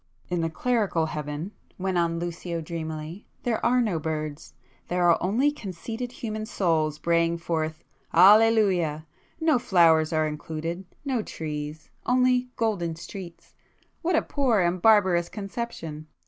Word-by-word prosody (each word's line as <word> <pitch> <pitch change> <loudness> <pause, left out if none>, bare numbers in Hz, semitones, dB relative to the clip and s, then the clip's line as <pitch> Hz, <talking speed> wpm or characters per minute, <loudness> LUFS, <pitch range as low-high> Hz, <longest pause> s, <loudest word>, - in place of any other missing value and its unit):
"In 175 -1 0
the 165 - 0
clerical 205 -3 0
Heaven," 150 +3 -4 0.3
went 190 0 -2
on 170 -1 +1
Lucio 170 0 -4
dreamily—"there 165 +7 -5
are 250 +1 +4
no 205 -9 0
birds. 155 -1 -4 0.3
There 175 0 +2
are 170 - +4
only 240 +11 +2
conceited 230 - -6
human 215 -3 -5
souls 160 -7 +1
braying 170 +1 +1
forth 160 -2 -3 0.3
'Alleluia'! 190 -5 +5 0.3
No 320 -5 +3
flowers 165 -7 +4
are 155 -1 +2
included,—no 170 - -4
trees; 150 -3 -6 0.2
only 250 0 +3
'golden 185 -8 -1
streets.' 175 +1 -10 0.5
What 345 +1 +1
a - - +3
poor 255 -8 +1
and 175 0 0
barbarous 190 -6 +4
conception! 195 -7 -6
175 Hz, 125 wpm, -26 LUFS, 160-220 Hz, 0.5 s, Alleluia